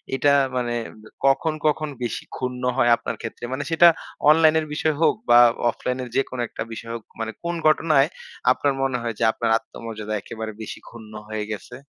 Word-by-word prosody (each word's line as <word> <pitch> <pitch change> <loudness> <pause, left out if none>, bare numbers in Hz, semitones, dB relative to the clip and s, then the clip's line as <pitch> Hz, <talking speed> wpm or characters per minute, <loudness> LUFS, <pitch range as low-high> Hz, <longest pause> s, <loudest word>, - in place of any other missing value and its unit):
এটা 140 +2 +3 0.2
মানে 120 -1 -1 0.5
কখন, 145 +4 +3
কখন 155 0 0
বেশি 120 - -3
ক্ষুণ্ণ 125 -1 -4
হয় 120 -2 +4
আপনার - - -5
ক্ষেত্রে? 115 +1 -6
মানে 145 - -2
সেটা 170 +1 +7 0.4
অনলাইনের 160 0 +5
বিষয় 155 0 0
হোক - - +4
বা 120 - +8 0.3
অফলাইনের 125 +1 -3
যেকোনো 130 -2 -1
একটা - - -5
বিষয় 115 +1 -7
হোক 115 - -7 0.2
মানে 115 0 -3
কোন 170 0 -2
ঘটনায় 155 -2 +4 0.4
আপনার 140 +2 +1
মনে 135 -2 0
হয় 115 -2 -3
যে - - 0
আপনার 115 0 -1
আত্মমর্যাদা 110 -2 -7
একেবারে 110 -1 -6
বেশি 110 - -7
ক্ষুণ্ণ 110 -2 -12
হয়ে 110 -1 -3
গেছে? 105 +4 -7
125 Hz, 170 wpm, -23 LUFS, 115-150 Hz, 0.5 s, বা